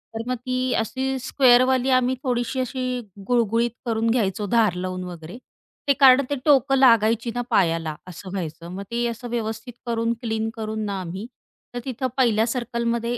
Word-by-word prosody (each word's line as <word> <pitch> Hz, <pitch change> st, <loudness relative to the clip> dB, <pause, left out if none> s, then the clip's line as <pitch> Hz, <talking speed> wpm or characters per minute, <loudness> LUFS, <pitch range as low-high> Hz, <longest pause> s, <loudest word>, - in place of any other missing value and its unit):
तर 230 Hz, +2 st, -4 dB
मग 255 Hz, -, 0 dB
ती 255 Hz, +1 st, -2 dB
अशी 265 Hz, +4 st, -1 dB
स्क्वेअरवाली 255 Hz, 0 st, +4 dB
आम्ही 255 Hz, 0 st, +3 dB
थोडीशी 245 Hz, 0 st, -1 dB
अशी 255 Hz, 0 st, -2 dB, 0.3 s
गुळगुळीत 235 Hz, -1 st, +2 dB
करून 230 Hz, -1 st, 0 dB
घ्यायचो 210 Hz, -4 st, 0 dB
धार 220 Hz, -3 st, +3 dB
लावून 185 Hz, 0 st, -4 dB
वगैरे. 175 Hz, +2 st, -8 dB, 0.5 s
ते 280 Hz, -, +5 dB
कारण 265 Hz, 0 st, +8 dB
ते 285 Hz, -, 0 dB
टोकं 270 Hz, -2 st, +4 dB
लागायची 230 Hz, -2 st, +4 dB
ना 245 Hz, -, 0 dB
पायाला 165 Hz, -7 st, +1 dB
असं 185 Hz, +2 st, -9 dB
व्हायचं. 170 Hz, -3 st, -5 dB
मग 195 Hz, +2 st, -6 dB
ते 240 Hz, 0 st, 0 dB
असं 235 Hz, +1 st, -6 dB
व्यवस्थित 225 Hz, +1 st, -4 dB
करून 230 Hz, -1 st, 0 dB
क्लीन 225 Hz, -1 st, -2 dB
करून 220 Hz, -1 st, -4 dB
ना 200 Hz, -2 st, -3 dB
आम्ही, 185 Hz, +4 st, -6 dB, 0.5 s
तर 245 Hz, -, -3 dB
तिथं 260 Hz, 0 st, -2 dB
पहिल्या 225 Hz, -4 st, +3 dB
सर्कलमध्ये 235 Hz, -1 st, -2 dB
235 Hz, 165 wpm, -23 LUFS, 215-255 Hz, 0.5 s, कारण